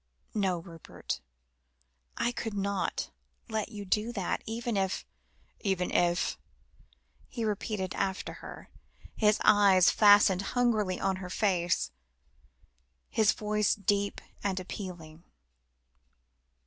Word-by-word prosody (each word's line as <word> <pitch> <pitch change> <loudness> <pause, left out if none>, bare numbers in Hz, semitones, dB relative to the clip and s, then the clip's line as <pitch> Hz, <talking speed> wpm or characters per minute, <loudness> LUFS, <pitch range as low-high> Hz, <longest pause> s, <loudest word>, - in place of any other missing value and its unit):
No, 195 -4 +1
Rupert, 165 -1 -7 1.0
I 240 - +1
could 225 -3 -4
not 200 -1 -2 0.4
let 220 -1 -2
you 205 -3 -7
do 215 +4 0
that, 195 -5 -2
even 230 +1 -2
if 190 -1 -1 0.3
" - - -38 0.2
"Even 190 -3 -1
if?" 175 0 +1 0.9
he 235 -4 -4
repeated 205 -2 -2
after 190 -1 -2
her, - - -10 0.4
his 210 -1 +3
eyes 200 -3 +6
fastened 205 -3 +6 0.2
hungrily 215 -7 +2
on 190 -1 0
her 185 -1 -7
face, 180 - +1 1.2
his 215 -1 +4
voice 210 -1 +1
deep 200 0 0 0.2
and 195 -2 0
appealing. 175 -4 -8
200 Hz, 110 wpm, -30 LUFS, 185-215 Hz, 1.2 s, eyes